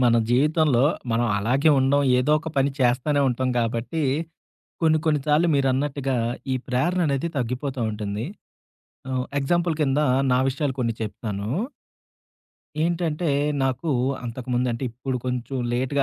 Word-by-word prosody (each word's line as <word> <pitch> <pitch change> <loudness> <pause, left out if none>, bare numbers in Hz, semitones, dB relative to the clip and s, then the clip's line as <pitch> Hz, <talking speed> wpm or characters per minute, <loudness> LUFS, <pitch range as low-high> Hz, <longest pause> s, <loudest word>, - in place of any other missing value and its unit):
మన 120 -1 +4 0.2
జీవితంలో 145 -1 +3 0.3
మనం 120 +1 +2
అలాగే 130 +9 +3
ఉండడం 135 +2 +3 0.2
ఏదో 135 +4 +2
ఒక 160 - -6
పని 135 +1 +3
చేస్తానే 130 +4 +2
ఉంటాం 130 +1 -1
గాబట్టి 115 +7 -1 0.8
కొన్ని 160 -1 +4
కొన్ని 150 -2 +3
సార్లు 150 +3 +3
మీరన్నట్టుగా 135 0 0 0.4
ఈ - - +2
ప్రేరణనేది 155 +3 +1
తగ్గిపోతూ 130 +1 -2
ఉంటుంది. 105 +1 -4 0.9
ఆహ్, 130 -1 -1
ఎగ్జాంపుల్ 170 +4 +1
కింద 140 0 +2 0.3
నా - - +4
విషయాలు 135 0 -2
కొన్ని 115 -2 0
చెప్తాను. 105 -2 -4 1.4
ఏంటంటే 170 -1 0 0.3
నాకు 135 +4 -1 0.3
అంతకుముందు 125 +1 -2
అంటే 120 +3 -4
ఇప్పుడు 125 +2 -4
కొంచెం 125 +1 -3 0.2
లేట్‌గా 130 +3 +1
135 Hz, 125 wpm, -24 LUFS, 125-150 Hz, 1.4 s, మన